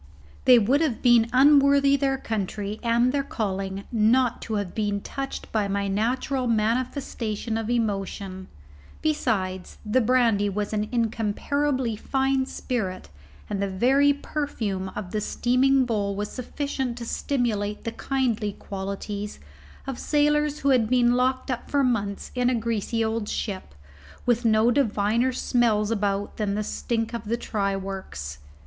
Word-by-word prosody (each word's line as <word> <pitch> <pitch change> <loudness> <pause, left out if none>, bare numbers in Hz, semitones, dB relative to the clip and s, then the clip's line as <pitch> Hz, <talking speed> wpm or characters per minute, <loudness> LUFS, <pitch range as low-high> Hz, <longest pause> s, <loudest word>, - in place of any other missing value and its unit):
They 250 -1 +8
would 250 +7 +3
have 280 -9 -1
been 240 -2 +5
unworthy 280 +1 +5
their 275 -1 +1
country 210 -2 -3
and 235 +1 +3
their 280 +1 +1
calling 195 -6 -3
not 235 +2 +3
to 220 - -3
have 200 -3 -3
been 205 -2 -1
touched 275 +5 -6
by 215 -2 +1
my 200 0 -1
natural 245 +6 0
manifestation 230 -1 -1
of 225 0 -2
emotion; 195 -4 -2 0.6
besides, 195 -12 -1
the 215 +5 +2
brandy 225 -4 +3
was 205 +2 -3
an 210 0 -1
incomparably 235 +3 0
fine 265 +3 0
spirit, 195 -11 -3 0.4
and 200 -1 -3
the 200 - +1
very 265 +9 +4
perfume 230 -10 -3
of 185 -4 -5
the 215 - -1
steaming 260 +4 +2
bowl 205 -4 -1
was 205 +1 -3
sufficient 260 -1 -3
to 235 - -6
stimulate 220 -6 -1
the 230 - -3
kindly 235 -6 -1
qualities 200 +1 -5 0.5
of 270 -2 -5
sailors 295 0 +1
who 280 - +2
had 240 -5 +3
been 245 -1 +4
locked 255 +1 +1
up 245 - -4
for 285 -1 +2
months 205 -6 -1
in 250 -1 +2
a 255 - +1
greasy 225 0 -1
old 220 -1 -2
ship, 190 - -4 0.5
with 240 0 +2
no 220 +1 +4
diviner 230 -1 +2
smells 230 -4 +1
about 205 -2 -1
than 205 -2 -1
the 215 - -1
stink 225 +2 -2
of 230 -1 -4
the 230 +3 -1
try 200 -4 -1
works. 190 - -6
230 Hz, 145 wpm, -25 LUFS, 205-255 Hz, 0.6 s, They